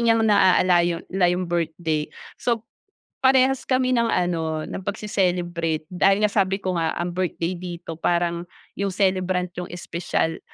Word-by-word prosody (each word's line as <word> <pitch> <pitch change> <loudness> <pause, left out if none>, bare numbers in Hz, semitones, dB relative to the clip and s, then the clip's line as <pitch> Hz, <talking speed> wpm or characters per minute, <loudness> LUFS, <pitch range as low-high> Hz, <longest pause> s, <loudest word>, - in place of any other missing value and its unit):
niyang 230 -1 +3
naaala 185 -4 +5
yon 170 0 -1
la 185 -2 +3
yung 180 +1 0
birthday. 165 -2 -1 0.3
So, 230 -2 0 0.6
parehas 265 0 +4
kami 255 -1 +1
ng 235 -1 +2
ano 160 -3 -1
ng 190 - -6
pagse-celebrate 175 -6 -1
dahil 195 +3 +2
nga 210 - +3
sabi 195 -1 +1
ko 185 -2 -2
nga 160 -1 0
ang 175 +1 -2
birthday 180 -1 -1
dito 175 -2 -7
parang 170 0 0 0.3
yung 200 0 -1
celebrant 185 -2 +1
yung 180 0 -5
espesyal. 170 -2 -2
180 Hz, 150 wpm, -23 LUFS, 170-200 Hz, 0.6 s, naaala